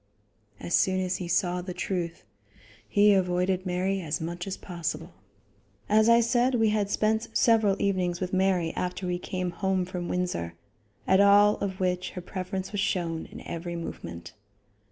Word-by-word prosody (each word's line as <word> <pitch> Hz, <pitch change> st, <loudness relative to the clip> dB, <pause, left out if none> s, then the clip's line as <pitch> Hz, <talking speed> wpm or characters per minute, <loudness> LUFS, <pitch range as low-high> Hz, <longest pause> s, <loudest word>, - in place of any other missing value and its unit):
As 175 Hz, -, -5 dB
soon 185 Hz, 0 st, +3 dB
as 185 Hz, 0 st, -1 dB
he 180 Hz, -, -5 dB
saw 180 Hz, +1 st, +1 dB
the 180 Hz, 0 st, -6 dB
truth, 170 Hz, -3 st, -3 dB, 0.7 s
he 205 Hz, 0 st, +5 dB
avoided 185 Hz, 0 st, +1 dB
Mary 185 Hz, +2 st, 0 dB
as 155 Hz, -3 st, -2 dB
much 175 Hz, +3 st, -5 dB
as 190 Hz, -, -4 dB
possible. 170 Hz, -3 st, -5 dB, 0.7 s
As 215 Hz, +2 st, +4 dB
I 235 Hz, 0 st, +6 dB
said, 245 Hz, +2 st, +2 dB
we 225 Hz, -2 st, +3 dB
had 210 Hz, -2 st, 0 dB
spent 220 Hz, +2 st, +1 dB
several 220 Hz, -4 st, +4 dB
evenings 180 Hz, -3 st, 0 dB
with 185 Hz, 0 st, -4 dB
Mary 185 Hz, -3 st, +1 dB
after 180 Hz, +1 st, -3 dB
we 180 Hz, 0 st, -1 dB
came 185 Hz, -1 st, -3 dB
home 190 Hz, 0 st, 0 dB
from 180 Hz, -1 st, -5 dB
Windsor, 130 Hz, -, -2 dB, 0.5 s
at 190 Hz, -, +4 dB
all 205 Hz, +1 st, +6 dB
of 190 Hz, -2 st, -4 dB
which 180 Hz, -1 st, -1 dB
her -, -, -3 dB
preference 185 Hz, +1 st, -5 dB
was 205 Hz, -2 st, -1 dB
shown 170 Hz, -4 st, -1 dB
in -, -, -11 dB
every 170 Hz, +1 st, -5 dB
movement. 85 Hz, -, -7 dB
185 Hz, 165 wpm, -27 LUFS, 175-200 Hz, 0.7 s, I